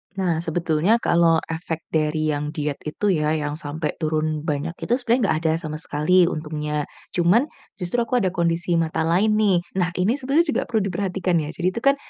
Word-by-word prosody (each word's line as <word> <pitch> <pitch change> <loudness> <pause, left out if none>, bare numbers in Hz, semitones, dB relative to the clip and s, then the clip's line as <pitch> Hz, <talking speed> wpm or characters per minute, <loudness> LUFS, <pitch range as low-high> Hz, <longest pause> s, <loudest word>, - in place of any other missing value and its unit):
Nah, 180 -4 0
sebetulnya 165 +3 +1
kalau 170 -1 +4
efek 165 0 -4
dari 155 0 +1
yang 145 0 -2
diet 150 -2 -2
itu 200 +6 0
ya 155 -2 +1
yang 150 -1 -2
sampai 150 0 -3
turun 155 0 0
banyak 155 +1 -2
itu 240 - +1
sebenarnya 245 -1 +1
enggak 155 - +1
ada 160 - +3
sama 155 -1 -5
sekali 160 +4 +2
untungnya. 150 -2 -3 0.2
Cuman, 180 +8 +3 0.3
justru 185 +6 -2
aku 245 +2 0
ada 185 - +1
kondisi 170 0 0
mata 160 0 0
lain 190 +7 +2
nih, 200 -5 +3 0.2
nah 180 -2 +1
ini 210 +7 +2
sebenarnya 285 +5 +1
juga - - +1
perlu 220 -3 +1
diperhatikan 185 -2 -1
ya, 150 - -5
jadi 175 +2 -1
itu 230 - -3
kan, 275 0 +5
170 Hz, 190 wpm, -23 LUFS, 155-190 Hz, 0.3 s, kan